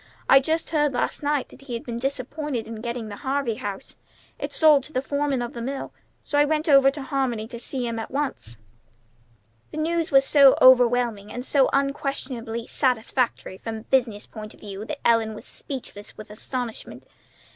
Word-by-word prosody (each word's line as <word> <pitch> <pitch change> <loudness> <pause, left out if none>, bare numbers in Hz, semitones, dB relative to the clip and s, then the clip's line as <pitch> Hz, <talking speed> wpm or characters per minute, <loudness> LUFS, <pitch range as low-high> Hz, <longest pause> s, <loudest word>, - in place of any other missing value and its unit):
I 270 - +8
just 320 +5 -1
heard 295 -3 +2
last 245 - -1
evening 290 -2 +1
that - - -15
he 245 - -3
had 230 - -5
been 235 -1 -5
disappointed 270 -1 -3
in 225 -1 -7
getting 235 -1 -4
the 205 - -7
Harvey 270 -2 -1
house. 200 -1 -6 0.4
It's - - -5
sold 300 -4 +6
to - - -11
the 255 - +1
foreman 285 -2 0
of 240 - -6
the 235 - -6
mill. 270 +3 -4 0.3
So 290 - 0
I - - +7
went 310 +1 0
over 275 -2 +7
to 280 0 -5
Harmony 255 -5 -1
to 235 - -7
see 250 +1 -3
him 230 -1 -3
at 225 - -5
once." 265 - -3 1.1
The - - -8
news 330 +1 0
was 270 -1 +5
so 275 -2 +7
overwhelming 245 -5 +5
and 245 +2 -5
so 275 -2 +3
unquestionably 265 -4 -2
satisfactory 245 -5 -1
from 225 -1 -5
a - - -8
business 230 -4 0
point 215 -1 -9
of - - -22
view 200 0 -7
that 285 +4 -3
Ellen 225 -2 +2
was - - -10
speechless 250 -7 -7
with 215 -1 -10
astonishment. 240 +2 -5
255 Hz, 190 wpm, -24 LUFS, 230-280 Hz, 1.1 s, I